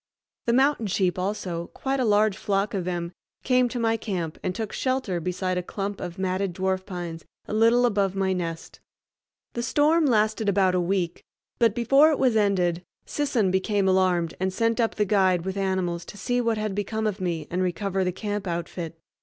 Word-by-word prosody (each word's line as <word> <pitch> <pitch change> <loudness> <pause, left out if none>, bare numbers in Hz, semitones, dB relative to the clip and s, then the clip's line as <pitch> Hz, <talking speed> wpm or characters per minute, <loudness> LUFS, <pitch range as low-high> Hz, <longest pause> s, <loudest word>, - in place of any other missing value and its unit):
The 235 - +3
mountain 265 -3 +3
sheep 185 -1 0
also, 180 -3 -3
quite 270 0 -1
a 255 - +2
large 210 -1 +3
flock 195 +1 -1
of 190 -3 -2
them, 175 -1 -3 0.3
came 250 -1 +3
to 245 - -5
my 225 -1 +1
camp 180 -8 -4
and 180 - -2
took 220 -2 -4
shelter 255 -9 -1
beside 180 +1 -2
a - - -2
clump 195 +2 -5
of 175 +1 -6
matted 190 -1 -1
dwarf 190 0 -1
pines 175 -4 -6 0.2
a - - -5
little 230 +3 +4
above 200 -4 +1
my 190 -1 +1
nest. 165 -2 -5 0.7
The 235 - -2
storm 300 +6 +3
lasted 215 -2 +2
about 190 -2 +3
a 180 - +2
week, 175 -1 -1 0.4
but 230 -3 +3
before 275 +6 +5
it 305 - +1
was 255 -4 +2
ended 185 -5 +2 0.2
Sisson 255 -10 0
became 195 +1 +1
alarmed 185 -3 +2
and 190 +1 0
sent 230 +4 0
up 225 -1 +1
the 210 - +1
guide 185 -3 +2
with 190 0 -3
animals 190 -3 -1
to 205 - -10
see 245 +3 0
what 230 -2 0
had 215 -1 -2
become 220 +2 -2
of 210 -2 -2
me 170 -4 -2
and 180 +2 0
recover 190 +1 -1
the 180 - 0
camp 205 +1 -4
outfit. 170 -1 -4
195 Hz, 195 wpm, -25 LUFS, 180-225 Hz, 0.7 s, before